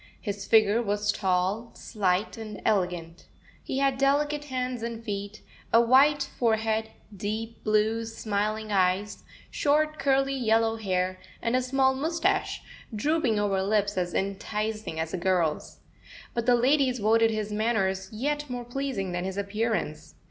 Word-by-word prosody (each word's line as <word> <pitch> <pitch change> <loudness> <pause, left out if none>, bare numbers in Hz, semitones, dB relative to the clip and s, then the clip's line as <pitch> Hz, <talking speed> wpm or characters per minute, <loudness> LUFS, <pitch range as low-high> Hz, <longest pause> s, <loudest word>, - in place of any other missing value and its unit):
His 200 -2 -5
figure 220 0 +5
was 205 -1 0
tall, 190 +4 0
slight, 190 -1 -1
and 215 -2 -7
elegant. 180 -4 -1 0.4
He 265 - -3
had 275 -1 +1
delicate 290 +2 +1
hands 255 -3 -3
and 230 0 -5
feet, 205 -1 -5 0.3
a 230 - +6
white 275 +5 +5 0.2
forehead, 220 -1 +1 0.3
deep 220 +3 -4
blue, 215 +1 +1
smiling 215 -1 -2
eyes, 195 +1 +1 0.3
short, 305 +1 +1
curly, 275 0 +2
yellow, 225 -3 +2
hair, 185 -3 -1 0.2
and 230 +1 0
a 255 - +3
small 265 +1 +2
moustache, 320 +6 0 0.3
drooping 275 -1 +1
over 200 -2 +1
lips 205 +1 +1
as 180 -2 -2
enticing 210 -1 -3
as 160 0 -3
a - - 0
girl's. 175 -4 0 0.5
But 235 0 -2
the 245 - +6
ladies 260 +1 +3
voted 225 +1 +3
his 215 -1 -3
manners 195 -3 0
yet 290 +6 -2
more 245 -1 -4
pleasing 245 -7 -3
than 175 0 -2
his 190 +1 -4
appearance. 200 -5 -2
220 Hz, 140 wpm, -27 LUFS, 200-250 Hz, 0.5 s, a